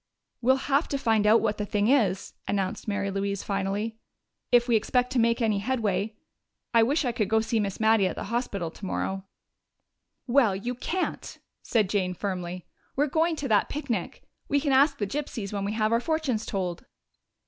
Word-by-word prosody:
"We'll 260 +2 +4
have 285 +3 +2
to 280 - -1
find 220 -5 +2
out 220 +2 +6
what 215 -2 -1
the 210 - -1
thing 205 +1 +1
is," 225 -7 +2
announced 195 0 -2
Mary 200 -1 -1
Louise 200 0 -2
finally, 200 +3 -2 0.5
"if 240 0 +5
we 235 - +3
expect 250 +3 +1
to 260 - +1
make 230 +1 +2
any 215 -3 +2
headway. 210 -3 -1 0.6
I 230 - +6
wish 280 +6 +2
I 245 - +1
could 220 -3 -1
go 220 - +4
see 225 +1 0
Miss 200 -2 -2
Mattie 220 -3 +4
at - - -3
the - - -5
hospital 200 -9 -2
tomorrow." 190 +1 -3 1.0
"Well, 240 -6 +3
you 235 +6 -3
can't," 350 +9 -3 0.2
said 220 -4 +1
Jane 185 -2 0
firmly. 180 -2 -4 0.3
"You're 290 - +4
going 320 +3 +1
to 290 -2 -4
that 210 -2 +3
picnic. 250 - -3 0.2
We 285 - +2
can 285 0 0
ask 280 +2 +4
the 205 - -1
gypsies 220 -4 -4
when 200 -1 -2
we 205 - -2
have 215 0 +1
our 230 - +3
fortunes 295 -8 -1
told." 180 -4 -3
220 Hz, 185 wpm, -27 LUFS, 200-250 Hz, 1.0 s, out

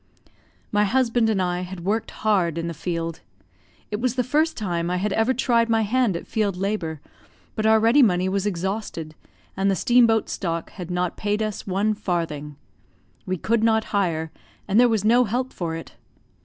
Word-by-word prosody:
My 210 0 +3
husband 235 0 +2
and 210 -3 +1
I 180 -1 0
had 180 -1 -7
worked 215 +3 0 0.2
hard 180 -6 +2
in 165 - -2
the 170 - -3
field; 165 0 -4 0.7
it 210 - -2
was 255 -1 0
the 250 - +1
first 310 +6 +1
time 175 -5 -2
I 180 - 0
had 195 +2 -1
ever 225 +3 +2
tried 235 -2 +2
my 225 -1 +3
hand 225 -3 +1
at - - -9
field 205 -5 -1
labour, 185 -5 -2 0.5
but 215 -1 0
our 220 0 +5
ready 230 +6 +5
money 185 -6 +3
was 195 +1 0
exhausted, 185 -4 -3 0.4
and 195 +1 +1
the 195 - +2
steam 240 +6 +4
boat 225 -1 +1
stock 170 -2 -3
had 180 -3 -8
not 180 0 -1
paid 210 +1 -1
us 215 -2 -4
one 200 +3 +1
farthing; 165 -8 -3 0.7
we 185 0 -1
could 225 +6 0
not 220 -1 +3
hire, 165 -5 0 0.4
and 200 +3 +3
there 245 0 +6
was 215 -3 0
no 240 +3 +5
help 250 +4 -2
for 165 -2 -3
it. 165 - -8
205 Hz, 190 wpm, -23 LUFS, 175-225 Hz, 0.7 s, there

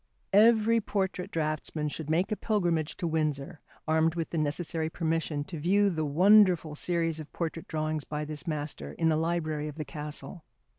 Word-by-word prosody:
Every 225 +2 +5
portrait 190 -3 -2
draughtsman 155 -1 -2
should 155 0 -6
make 170 +6 +1
a - - +2
pilgrimage 175 -9 0
to - - -3
Windsor, 155 0 -2 0.3
armed 160 +1 +2
with 165 -2 -3
the 170 - -2
necessary 160 +2 -1
permission 160 -3 -1
to 165 +1 -7
view 200 +5 +3
the 160 -2 -2
wonderful 180 0 +5
series 165 0 0
of 155 - -9
portrait 165 -1 -4
drawings 155 -1 -2
by 150 +1 -4
this 150 +1 -6
master 150 -2 -4
in 165 -1 +1
the 155 - +3
library 155 -2 -1
of 150 - -7
the 155 -1 -5
castle. 150 +3 -5
160 Hz, 170 wpm, -29 LUFS, 155-175 Hz, 0.3 s, Every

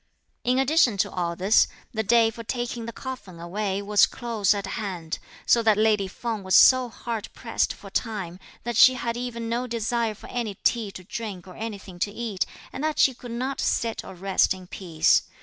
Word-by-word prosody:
In 250 +1 +2
addition 265 -5 +3
to - - +1
all 170 -2 -2
this, 190 +5 +4 0.3
the 220 - 0
day 225 +1 +4
for 230 +1 -9
taking 240 0 -3
the - - -4
coffin 230 -8 -8
away 195 +3 -2
was 205 0 +5
close 225 -5 0
at 200 - -3
hand, 180 -7 -4 0.3
so 235 - +5
that 220 -2 +4
lady 215 -2 +3
Feng 220 +2 -4
was 190 0 +1
so 255 -1 +7
hard 225 -2 -5
pressed - - 0
for - - -11
time 195 -6 -3 0.2
that 240 0 -3
she 255 +2 +8
had 235 -1 -2
even 240 -1 -4
no 240 +2 -1
desire 230 -1 -1
for - - -14
any 230 -5 -2
tea 225 +1 0
to 185 - -9
drink 195 -2 -6
or 185 - -10
anything 200 -5 -7
to 205 - 0
eat, 215 -3 -2 0.3
and 275 - -5
that 310 -1 0
she 265 - +5
could 245 0 -11
not 255 +4 -3
sit 230 -1 0
or 190 - -10
rest 190 +1 +2
in 185 -1 -11
peace. 175 -3 +2
220 Hz, 200 wpm, -25 LUFS, 195-235 Hz, 0.3 s, she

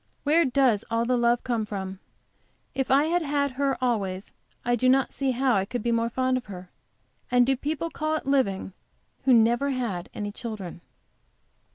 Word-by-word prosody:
Where 320 +3 +4
does 255 -5 +2
all 230 0 +1
the 250 +1 +2
love 240 0 +2
come 235 -3 -1
from? 195 -2 -5 0.7
If 265 0 -2
I 275 +2 +5
had 345 +2 +1
had 285 -2 0
her 275 +1 0
always 200 -6 -1 0.3
I 240 0 +2
do 255 +2 +2
not 265 +1 +3
see 275 -1 -1
how 260 0 +2
I 195 - +2
could 225 +3 -4
be 235 - +1
more 230 0 +1
fond 255 +1 0
of 255 - -6
her. 185 -3 -10 0.6
And 245 0 +4
do 270 +1 +2
people 310 +5 -3
call 310 0 -1
it 310 - -4
living 250 -9 0 0.5
who 265 - +5
never 235 +5 +3
had 235 -10 -3
any 205 0 -4
children? 205 -6 -7
245 Hz, 185 wpm, -26 LUFS, 215-270 Hz, 0.7 s, I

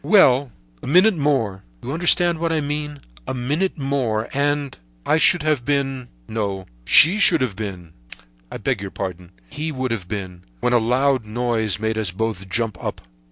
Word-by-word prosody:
"Well, 135 - +5 0.3
a - - -8
minute 185 +8 +5
more—you 110 - -2
understand 175 +1 +3
what 165 0 0
I 160 - +1
mean? 150 0 -3 0.3
A - - -2
minute 150 +11 -1
more, 130 -6 -1
and—I 140 - -1
should 175 0 +4
have 155 -5 +1
been—no, 115 - -3 0.2
she 180 - +6
would 165 - +1
have 120 -7 -1
been!—I - - -10
beg - - -1
your 100 - -5
pardon, 90 -3 -6 0.2
he 155 +1 -3
would 130 -3 -3
have 105 -6 -3
been—when 90 - -4
a 120 - +5
loud 130 +2 +1
noise 110 -2 -1
made 110 +1 -1
us 105 -4 -1
both 95 0 -3
jump 115 +1 -2
up. - - -4
120 Hz, 155 wpm, -21 LUFS, 95-145 Hz, 0.3 s, she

